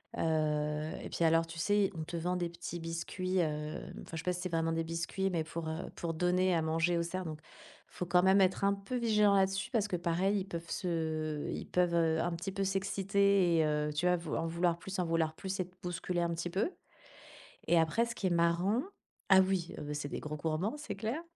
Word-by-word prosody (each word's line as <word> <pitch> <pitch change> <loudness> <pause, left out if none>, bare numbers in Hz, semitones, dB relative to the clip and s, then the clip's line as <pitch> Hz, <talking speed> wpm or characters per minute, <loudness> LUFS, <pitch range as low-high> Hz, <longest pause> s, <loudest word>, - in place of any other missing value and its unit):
heu 155 -1 0
et - - -6
puis, - - -1
alors, 165 0 +4
tu 165 0 -9
sais, 205 +3 +2
on 160 - -3
te 165 +2 -6
vend 175 +2 -1
des 175 -1 -1
petits 170 0 -6
biscuits, 170 +3 -3
hem, 150 -3 -2
enfin, - - -14
je - - -3
sais 160 - -5
pas 180 - +1
si 180 - -5
c'est 185 - -3
vraiment 165 -1 0
des 165 0 0
biscuits, 170 +4 -2
mais 165 -3 0
pour, 165 +1 -5
heu, 160 +2 -4
pour 170 -1 -3
donner 180 +2 +2
à 165 - +2
manger 165 +2 +1
aux - - +2
cerfs, 185 +2 -4
donc, 155 -2 -5
il - - -20
faut 180 - -2
quand 180 +1 +4
même 190 +2 +5
être 190 +1 +2
un 200 0 +4
peu 200 +6 -6
vigilant 210 -4 +4
là-dessus 195 0 +1
parce 220 -5 +1
que 190 - -1
pareil, 175 +4 +1
ils - - -5
peuvent 170 -2 -6
se 160 -4 -2
ils - - -4
peuvent, 180 -1 +1
heu, 160 -1 +3
un 175 +1 0
petit 170 +3 -4
peu 195 +1 -2
s'exciter 195 -1 +2
et 160 - +4
heu, 150 0 0
tu 150 +4 -1
vois, 180 0 +5
vou 170 -3 -4
en 165 - -1
vouloir 170 +1 +1
plus, 190 +2 -6
en 180 - +1
vouloir 165 -1 +1
plus 190 +2 -4
et 185 - -1
te 180 - -24
bousculer 175 0 -2
un 170 - +1
petit 170 +1 -4
peu 200 - 0 1.0
et 170 - +5
après, 160 +9 +2
ce 235 0 -5
qui 200 - -2
est - - +2
marrant 175 +7 +2 0.5
ah 190 -1 +9
oui, 185 -2 0
heu, 150 -1 -5
c'est 145 -1 -3
des - - -4
gros 150 0 -5
gourmands, 160 - -1
c'est 300 - -5
clair 225 +10 -3
175 Hz, 240 wpm, -33 LUFS, 165-190 Hz, 1.0 s, ah